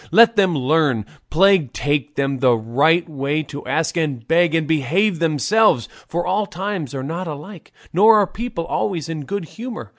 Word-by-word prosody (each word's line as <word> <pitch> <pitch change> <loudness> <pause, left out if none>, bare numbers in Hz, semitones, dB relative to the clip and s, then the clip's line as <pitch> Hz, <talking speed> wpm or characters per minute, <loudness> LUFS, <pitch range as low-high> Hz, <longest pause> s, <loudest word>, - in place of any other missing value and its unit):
Let 230 +6 +6
them 190 -5 +2
learn, 135 -5 +1 0.2
plague 180 -5 +3
take 145 0 -2
them, 135 -2 -1
the 125 -2 +3
right 145 +11 +2
way 145 0 -2
to 145 0 -9
ask, 160 +1 -1
and 140 -8 -2
beg, 165 0 +3
and 160 -1 +1
behave 160 - +1
themselves; 165 - +2 0.2
for 175 +1 -3
all 200 +3 0
times 180 - -5
are 130 - -4
not 165 +6 -4
alike, 160 +4 -9 0.2
nor 215 +5 +6
are 205 - +4
people 215 -4 -5
always 170 -2 -2
in 155 -3 -5
good 200 0 -4
humour. 230 +7 -8
165 Hz, 175 wpm, -20 LUFS, 145-190 Hz, 0.2 s, Let